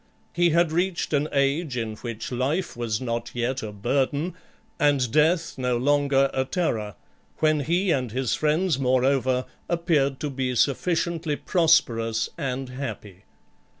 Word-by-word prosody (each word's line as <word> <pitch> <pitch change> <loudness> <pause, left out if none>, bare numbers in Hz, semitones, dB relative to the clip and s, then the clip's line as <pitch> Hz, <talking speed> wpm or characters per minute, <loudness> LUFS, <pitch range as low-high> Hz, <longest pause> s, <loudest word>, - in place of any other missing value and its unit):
He 175 0 +3
had 170 0 +3
reached 175 0 -1
an 150 +1 +1
age 140 0 0
in 110 -2 -2
which 115 0 -6
life 140 +9 -1
was 115 -2 -2
not 120 -2 -3
yet 125 +2 -1
a 110 - -5
burden, 140 - -1 0.5
and 140 -5 +2
death 160 +1 +2
no 125 -1 0
longer 140 +1 +2
a 130 - +1
terror; 115 - -2 0.4
when 155 -1 +2
he 175 +6 +1
and 130 -6 0
his 130 0 -1
friends, 155 0 +1
moreover, 130 0 +2 0.2
appeared 160 -6 +1
to 150 - -2
be 130 -1 -2
sufficiently 160 +4 0
prosperous 120 -11 +2
and 135 -1 -3
happy. 110 -8 -7
135 Hz, 140 wpm, -25 LUFS, 125-160 Hz, 0.5 s, He